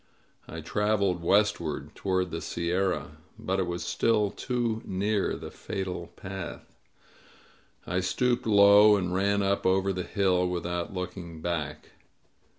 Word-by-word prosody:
I - - -7
traveled 100 -4 0
westward, 105 +5 +1
toward 95 -2 -1
the 85 - -4
sierra. 90 +2 -1 0.2
But 95 +1 -2
it 95 - 0
was 85 0 -3
still 105 -3 +1
too 120 -1 -2
near 100 +2 0
the - - -8
fatal 90 -3 -5
path. 95 -1 -8 1.1
I 90 +2 -1
stooped 120 +6 0
low 105 0 +7
and 90 -3 -1
ran 100 +2 +1
up 100 0 +1
over 95 +1 +2
the 90 - -3
hill, 90 -1 +1
without 85 0 -3
looking 90 -3 -6
back. 80 -3 -4
95 Hz, 130 wpm, -28 LUFS, 90-100 Hz, 1.1 s, low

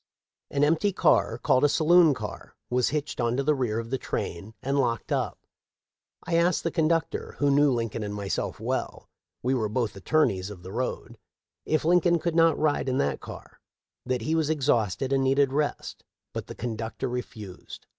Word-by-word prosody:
An 140 0 0
empty 165 +7 +3
car, 115 - +2
called 130 +2 +2
a 145 - +5
saloon 165 -1 +5
car, - - -8 0.2
was 125 0 +2
hitched 150 -3 -3
on 120 +1 0
to 140 - +1
the 150 +2 +3
rear 125 -6 -1
of 115 +1 -5
the 130 - -1
train 100 +6 -4
and 140 +2 0
locked 120 -3 -1
up. - - -1 0.9
I 165 - 0
asked 170 +1 +2
the 165 - -1
con 155 0 +2
ductor, 165 -1 -1
who 145 -1 +2
knew 145 +1 +5
Lincoln 115 -2 -2
and 105 -1 -4
myself 100 -1 -3
well, - - -4
— - - -59
we 130 +2 +1
were 110 -5 0
both 110 -2 -1
attorneys 100 -4 +1
of 95 -4 -10
the 95 - -8
road, 120 0 -4 0.3
— - - -65
if 155 0 +1
Lincoln 175 0 +4
could 170 0 -2
not 165 0 +4
ride 145 -3 +1
in 130 - 0
that 70 -1 0
car; - - -11 0.4
that 125 -1 -1
he 155 - -1
was 160 -2 +1
exhausted 130 -5 +1
and 135 0 +2
needed 135 0 +2
rest; 145 0 -2 0.3
but - - -5
the - - -8
conductor 115 +2 -4
refused. 115 -6 -7
130 Hz, 195 wpm, -26 LUFS, 115-155 Hz, 0.9 s, a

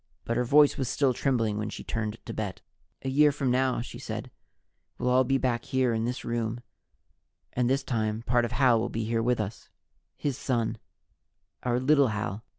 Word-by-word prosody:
But 115 - -1
her 125 - +2
voice 145 +4 +5
was 130 -3 -1
still 135 -3 +2
trembling 115 -5 0
when 105 0 -2
she - - -7
turned 110 -1 -3
to 115 - -5
Bet. 105 -4 -4 0.4
"A 135 - -1
year 145 +2 +5
from 140 -3 -1
now," 130 -1 +2
she 120 - -8
said, - - -6 0.7
"we'll 125 - 0
all 130 +1 +5
be 135 +2 +2
back 120 -3 -1
here 130 -3 +1
in 110 0 0
this 125 +1 -3
room 115 0 -2 0.9
and, 125 -1 +1
this 135 +1 +1
time, 110 -3 -1
part 120 0 +2
of 120 - -2
Hal 125 -3 +4
will 110 - -1
be 115 0 -3
here 115 +1 0
with 120 +1 +1
us 105 +1 -5 0.5
his 140 -4 -2
son, 120 -4 -1 0.8
our 125 0 0
little 140 +1 +4
Hal." 110 -1 -3
120 Hz, 195 wpm, -28 LUFS, 115-130 Hz, 0.9 s, voice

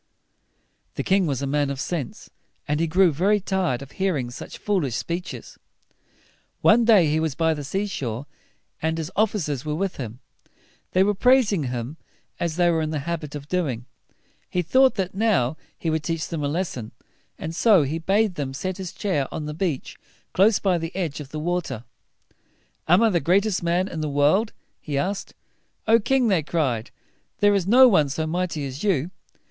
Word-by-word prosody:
The - - -2
king 190 -2 +2
was 140 -2 -2
a - - 0
man 145 +1 0
of 140 -1 -4
sense, 150 -4 -4 0.4
and 150 +1 0
he 165 - +1
grew 180 +2 +4
very 195 +8 +2
tired 185 -10 -1
of 140 - -13
hearing 155 -11 -1
such - - -8
foolish 175 - -1
speeches. 175 +6 -5 1.0
One 230 +2 +5
day 215 -7 +6
he 155 +1 +1
was 160 -4 -1
by 160 -1 +2
the 150 -2 -5
sea 190 +9 -2
shore, 130 - -4 0.6
and 160 +1 0
his 160 -1 -3
of 215 +3 +2
fi 210 - -4
cers 145 -8 -3
were 150 -1 -2
with 190 +3 -2
him. 120 -2 -6 0.7
They 185 - +5
were 205 +1 +2
praising 215 - +3
him, 125 +4 -4 0.4
as 170 -2 -1
they 175 0 +3
were 165 -1 +1
in 155 - -1
the 155 - -2
habit 160 -4 -4
of 145 -1 -7
doing. 145 -10 -1 0.6
He 180 - 0
thought 260 +9 +4
that 190 -3 -2
now 190 - +1 0.2
he 165 - -2
would 160 0 0
teach 165 -2 -2
them 160 -3 -3
a - - +1
lesson, 145 -8 -3 0.4
and 160 +1 -5
so 200 -5 +5
he 150 +4 -2
bade 200 +4 +2
them 135 -4 -4
set 185 +6 -3
his 185 -3 -6
chair 150 -10 -1
on 150 - -4
the 150 - -4
beach 160 -4 -3 0.3
close 200 +3 +5
by 185 -4 +1
the 165 +2 -6
edge 170 -7 -2
of 145 -3 -8
the 155 - -5
water. 160 -8 -2 1.0
"Am 180 +7 +5
I 225 - +4
the 175 - +2
greatest 190 +6 +2
man 175 +2 +1
in 165 -5 -5
the 155 - -2
world?" 150 +10 +2 0.3
he 145 -2 -4
asked. 195 +6 -2 0.5
"O 225 +1 +6
king!" 255 +2 +2
they 190 -6 +3
cried, 135 -8 -1 0.5
"there 205 0 +4
is 195 -3 0
no 255 +5 +8
one 155 - +3
so 155 +3 -2
mighty 170 -2 -2
as 135 +2 -6
you." 180 -5 +1
165 Hz, 195 wpm, -24 LUFS, 145-195 Hz, 1.0 s, no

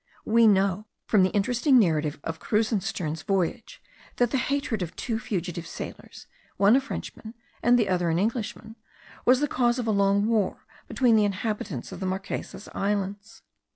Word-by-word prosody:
We 230 +1 +5
know, 200 0 +2 0.2
from 210 - +3
the 185 - +4
interesting 245 +7 +2
narrative 155 - +2
of 165 0 -5
Krusenstern's 195 -7 -1
voyage, 195 +3 -2 0.3
that 245 -1 +1
the 270 - +1
hatred 275 -7 -1
of 170 -2 -4
two 225 -3 -3
fugitive 175 -5 -4
sailors, - - -9 0.3
one 200 +4 +5
a 275 - +4
Frenchman 230 -4 -7 0.3
and 245 +1 +5
the 225 -4 +2
other 180 -2 +1
an 165 - +1
Englishman, 220 +2 -3 0.5
was 255 +2 +5
the 295 - +2
cause 245 -2 +1
of 245 - -2
a 220 - +1
long 200 0 +2
war 220 -4 0 0.2
between 240 -4 +3
the 215 - +4
inhabitants 200 - -3
of - - -8
the 190 - -2
Marquesas 190 +2 -5
Islands. 205 +2 -3
210 Hz, 165 wpm, -26 LUFS, 190-230 Hz, 0.5 s, We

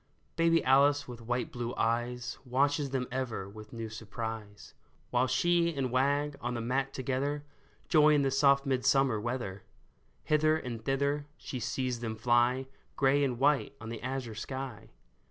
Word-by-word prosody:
Baby 165 0 +3
Alice 140 +2 +4
with 120 -2 -8
wide 120 +2 -2
blue 120 0 -4
eyes 120 +1 -1
Watches 140 +3 +1
them 130 -1 -2
ever 125 -7 -3
with 105 +1 -11
new 115 -1 -5
surprise, 110 -1 -7 0.4
While 125 +1 +2
she 170 +5 +2
and 130 -3 -1
Wag 140 +3 +1
on 120 +1 -2
the - - -2
mat 130 +4 -1
together 135 +3 -2 0.4
Joy 150 -1 +6
in 145 - +3
the 135 - +1
soft 140 +1 +4
midsummer 130 -2 +2
weather. 115 -5 -3 0.6
Hither 155 0 +3
and 120 -7 -6
thither 140 +3 0
she 130 - -6
sees 125 +2 -2
them 115 -2 -3
fly, 120 +3 +2 0.3
Gray 140 +1 +3
and 130 -3 0
white 140 +1 +2
on 110 0 -7
the 115 -1 -6
azure 130 -3 -4
sky. 130 +1 -6
130 Hz, 155 wpm, -31 LUFS, 120-140 Hz, 0.6 s, Joy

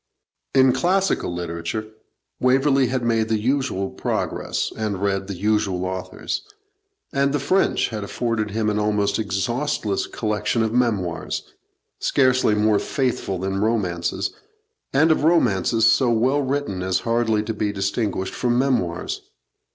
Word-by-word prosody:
In 130 -1 +6
classical 190 - +1
literature, 85 +4 -4 0.5
Waverley 135 +1 +3
had 130 0 -1
made 115 -1 +1
the 110 - +2
usual 115 -4 -1
progress, - - -2
and 105 -3 -2
read 100 -1 -1
the 100 - -4
usual 100 -2 0
authors; 95 0 -4 0.7
and 140 -1 +2
the 145 - +1
French 185 +8 +2
had 110 -2 -4
afforded 110 +1 -2
him 105 +1 0
an 105 - 0
almost 105 -1 +1
exhaustless 110 +2 -1
collection 110 +1 -1
of 110 0 -1
memoirs, 105 -9 0 0.6
scarcely 130 -5 +3
more 105 0 +3
faithful 125 -8 -1
than 95 +2 -2
romances, 95 -4 0 0.6
and 155 +4 +4
of 155 - +2
romances 115 - +3
so 125 +1 +4
well 125 +5 +2
written 135 -8 -2
as 95 0 0
hardly 115 -2 +1
to 110 +1 -3
be 105 -1 -1
distinguished 100 -1 -2
from 120 -1 0
memoirs. 120 -10 0
110 Hz, 135 wpm, -22 LUFS, 100-130 Hz, 0.7 s, In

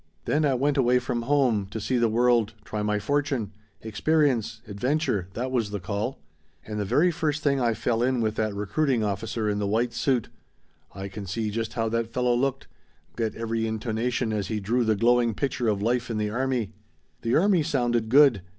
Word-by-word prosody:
"Then 150 +1 +2
I 135 -2 +2
went 140 +3 +1
away 125 -1 +4
from 125 -1 -2
home. 120 -6 +2
To 110 +3 -6
see 125 +4 0
the 115 -1 +3
world. 115 -1 +2
Try 105 - -3
my 105 0 0
fortune. 135 -3 -1 0.3
Experience. 115 0 0
Adventure. 105 - -1
That 130 +3 -2
was 115 -5 0
the 105 0 -4
call. 100 +7 -3 0.5
"And 105 -1 -4
the 105 - -1
very 165 - +3
first 155 -2 -2
thing 140 -2 +2
I 115 -2 +2
fell 115 0 0
in 125 0 +1
with 110 -2 0
that 110 -2 -2
recruiting 115 +4 0
officer 105 +2 -2
in 105 0 0
the 100 - -1
white 115 +3 0
suit. 120 -1 0 0.7
I 100 0 -5
can 100 0 -8
see 105 +3 -2
just 115 +1 -3
how 115 -2 -1
that 115 0 -1
fellow 125 0 +1
looked. 135 +2 -1 0.5
Get 115 -2 -2
every 115 0 -2
intonation 110 +1 -1
as 100 -3 -2
he 110 0 -2
drew 115 +5 +1
the 110 -1 +2
glowing 120 +1 +3
picture 130 -2 -1
of 100 -2 0
life 120 +1 0
in 115 - -2
the 105 -1 -1
army. 120 -3 -1 0.5
"The 115 0 +1
army 190 0 +4
sounded 120 -7 0
good. 135 -5 +6
115 Hz, 195 wpm, -26 LUFS, 110-130 Hz, 0.7 s, good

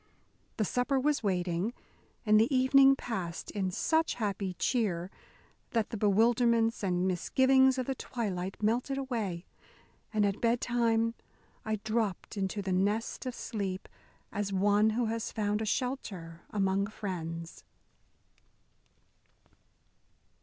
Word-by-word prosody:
The 215 - +1
supper 250 +5 +1
was 295 +2 +1
waiting, 185 +1 -1 0.5
and 215 0 +6
the 225 +6 +3
evening 270 +1 +6
passed 190 -10 -5
in 195 -3 -1
such 320 - +1
happy 200 -4 -2
cheer 190 -6 0 0.6
that 225 -3 0
the - - -3
bewilderments 230 +2 +3
and 180 -2 +1
misgivings 260 +8 +3
of 255 - -1
the 270 - -1
twilight 195 -8 -4
melted 245 +5 +1
away, 220 -10 -3 0.7
and 215 -2 +2
at 200 0 -1
bedtime 230 -1 +2 0.5
I 220 -2 -1
dropped 215 -1 -2
into 195 0 -2
the 190 -1 -1
nest 205 +7 0
of 250 - -4
sleep 195 -4 -4 0.4
as 205 -1 -2
one 205 +3 +3
who 235 +2 0
has 225 0 -2
found 210 -1 -1
a - - -1
shelter 200 -9 -3
among 195 -1 +1
friends. 170 -6 -6
215 Hz, 120 wpm, -30 LUFS, 190-240 Hz, 0.7 s, and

